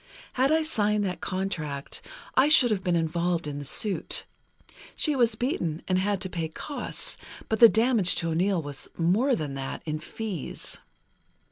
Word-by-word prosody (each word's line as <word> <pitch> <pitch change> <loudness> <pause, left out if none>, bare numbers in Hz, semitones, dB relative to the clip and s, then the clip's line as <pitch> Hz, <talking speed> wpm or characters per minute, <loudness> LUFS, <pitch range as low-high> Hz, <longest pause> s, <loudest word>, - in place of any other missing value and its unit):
Had 265 +3 +2
I 320 0 +3
signed 210 -8 +1
that 180 -2 -3
contract, 165 -7 -3 0.3
I 265 +3 +4
should 260 -6 +6
have 195 -3 0
been 175 -1 +1
involved 170 +1 0
in 145 -1 -4
the 145 - -6
suit. 200 +8 0 0.7
She 300 -3 +1
was 235 -4 +3
beaten, 180 - -2
and 185 -1 +2
had 200 +1 0
to - - -1
pay 165 -3 -3
costs, 280 - -5 0.3
but 220 - -1
the 230 -2 +10
damage 225 -5 +4
to 165 - 0
O'Neill 180 +1 +1
was 145 -1 -6
more 210 +11 +3
than 150 -6 -4
that, 135 -1 -5
in 155 -1 -2
fees. 190 - -6
185 Hz, 165 wpm, -27 LUFS, 160-225 Hz, 0.7 s, the